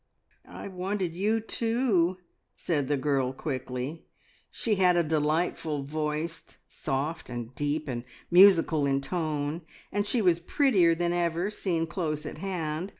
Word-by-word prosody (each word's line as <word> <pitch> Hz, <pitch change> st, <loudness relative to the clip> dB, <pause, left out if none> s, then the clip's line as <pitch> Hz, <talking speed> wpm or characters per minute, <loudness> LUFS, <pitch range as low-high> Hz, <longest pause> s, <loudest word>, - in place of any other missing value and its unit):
"I -, -, -8 dB
wanted 185 Hz, -1 st, -2 dB
you 210 Hz, +5 st, +1 dB
too!" 225 Hz, -6 st, +1 dB, 0.4 s
said 145 Hz, -6 st, -1 dB
the 145 Hz, 0 st, +1 dB
girl 135 Hz, -2 st, 0 dB
quickly. 130 Hz, +2 st, -4 dB, 0.4 s
She 225 Hz, -, -1 dB
had 180 Hz, -2 st, +4 dB
a 170 Hz, -, +4 dB
delightful 155 Hz, -1 st, 0 dB
voice; 155 Hz, +3 st, -3 dB, 0.2 s
soft, 145 Hz, +5 st, -3 dB
and 120 Hz, 0 st, -6 dB
deep, 145 Hz, +2 st, -2 dB
and 120 Hz, -3 st, -3 dB, 0.3 s
musical 170 Hz, -5 st, +6 dB
in 135 Hz, 0 st, +1 dB
tone, 155 Hz, 0 st, -2 dB, 0.3 s
and 205 Hz, +1 st, 0 dB
she 245 Hz, -, +1 dB
was 180 Hz, -5 st, +3 dB
prettier 180 Hz, -, +3 dB
than 175 Hz, +1 st, 0 dB
ever, 175 Hz, +3 st, 0 dB
seen 170 Hz, -6 st, -1 dB
close 160 Hz, -3 st, -3 dB
at -, -, -7 dB
hand. 175 Hz, -2 st, -3 dB
165 Hz, 140 wpm, -28 LUFS, 145-185 Hz, 0.4 s, musical